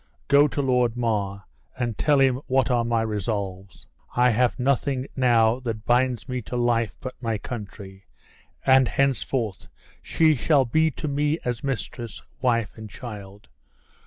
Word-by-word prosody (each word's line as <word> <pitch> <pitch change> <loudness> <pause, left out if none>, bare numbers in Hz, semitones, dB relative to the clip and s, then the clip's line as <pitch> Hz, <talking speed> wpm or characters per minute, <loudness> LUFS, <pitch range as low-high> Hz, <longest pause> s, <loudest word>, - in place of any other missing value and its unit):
GO 145 +1 +6
to 145 0 -2
Lord 125 -3 +1
Mar, 100 -4 -1 0.3
and 120 -3 -2
tell 145 +6 +2
him 135 -2 +4
what 130 0 +2
are 120 -1 +2
my 115 -1 +1
resolves. 100 -3 -4 0.3
I 125 0 +4
have 125 +3 +1
nothing 135 0 0
now 120 -2 +3
that 115 -4 -5
binds 125 0 +1
me 125 -1 -3
to 120 - -7
life 115 -3 +1
but 130 -1 -6
my 115 -3 -1
country; 100 -4 -9 0.6
and 130 -1 +5
henceforth 120 -2 -1 0.3
she 160 -1 +3
shall 140 0 +2
be 160 +6 +2
to 155 +1 -6
me 145 +2 0
as 125 +1 -2
mistress, 125 -3 -4 0.2
wife 115 -4 +1
and 110 -1 -8
child. 100 -4 -10
120 Hz, 150 wpm, -24 LUFS, 110-130 Hz, 0.6 s, GO